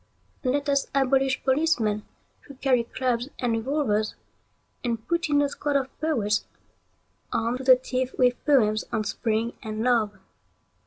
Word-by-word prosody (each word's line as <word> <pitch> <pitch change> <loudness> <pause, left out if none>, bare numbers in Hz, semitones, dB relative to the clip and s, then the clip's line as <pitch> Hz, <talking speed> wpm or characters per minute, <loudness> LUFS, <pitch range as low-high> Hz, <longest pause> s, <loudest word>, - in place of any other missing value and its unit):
Let 285 +3 0
us 280 -1 +2
abolish 270 0 +2
policemen 260 -7 +1 0.4
who 280 - -11
carry 255 -3 +2
clubs 250 +1 -1
and 245 -2 0
revolvers, 225 -3 0 0.7
and 230 -3 -3
put 340 -2 0
in 290 -1 +4
a 285 - 0
squad 290 0 -2
of 270 -1 -1
poets 225 -10 0 0.8
armed 230 +3 -1
to - - -6
the 255 -1 +9
teeth 255 0 -3
with 250 -1 +2
poems 215 -7 +3
on 220 -2 0
Spring 225 +2 -1
and 215 0 -4
Love. 225 -4 +2
255 Hz, 145 wpm, -26 LUFS, 225-275 Hz, 0.8 s, the